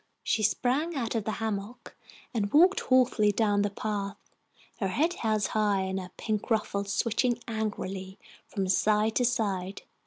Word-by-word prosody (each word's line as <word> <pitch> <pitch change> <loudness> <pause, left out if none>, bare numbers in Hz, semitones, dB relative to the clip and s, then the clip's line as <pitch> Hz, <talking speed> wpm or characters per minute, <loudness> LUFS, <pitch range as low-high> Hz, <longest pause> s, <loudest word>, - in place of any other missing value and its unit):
She 220 - +1
sprang 260 - +1
out 240 -5 -2
of 225 -3 -1
the 220 - -1
hammock 220 +1 -5 0.4
and 205 -4 -1
walked 360 +6 +6
haughtily 250 -5 +3
down 205 -1 +2
the 205 - +1
path, 200 -1 -3 0.6
her 195 - 0
head 310 - +1
held 215 - 0
high, 205 -2 +1
and 190 0 -2
her 180 -1 -7
pink 215 -2 -2
ruffles 200 -3 0
switching 235 +3 +1
angrily 195 -4 -4 0.3
from 195 -2 -2
side 210 +3 +2
to 245 - +3
side. 200 -6 -1
215 Hz, 155 wpm, -28 LUFS, 200-235 Hz, 0.6 s, walked